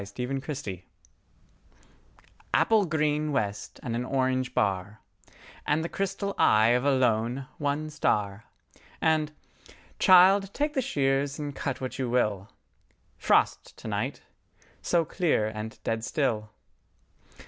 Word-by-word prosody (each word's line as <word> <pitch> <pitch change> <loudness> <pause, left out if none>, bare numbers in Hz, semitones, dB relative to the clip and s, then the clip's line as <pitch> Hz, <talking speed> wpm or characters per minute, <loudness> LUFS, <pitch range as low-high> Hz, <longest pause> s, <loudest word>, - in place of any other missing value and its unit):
Thomas 100 +1 -10 0.3
"Frost 145 -2 -4
To 100 - -3
Night" 90 -1 -10 1.7
APPLE 220 -3 +4
GREEN 155 -1 0
west 105 -7 -3
and 115 -3 -3
an 120 - -1
orange 130 -1 -1
bar, 100 +1 -1 0.7
And 150 +2 +1
the 170 - -3
crystal 195 +1 -2
eye 110 +1 +5
of 125 +1 +2
a 140 - +3
lone, 125 0 +1
one 150 +1 -2
star 105 -8 -1 0.5
…And, 155 -1 +1 0.7
"Child, 190 +2 +6
take 295 +1 0
the 265 - +1
shears 140 - 0
and 145 -2 -5
cut 135 -2 -3
what 130 +1 -5
you 130 -2 -1
will, 105 -5 0 0.7
Frost - - +1
to - - -9
night—so 170 -2 -4
clear 160 - +1
and 110 0 -6
dead 115 0 -2
still." 110 -4 -1
135 Hz, 125 wpm, -27 LUFS, 110-155 Hz, 1.7 s, Child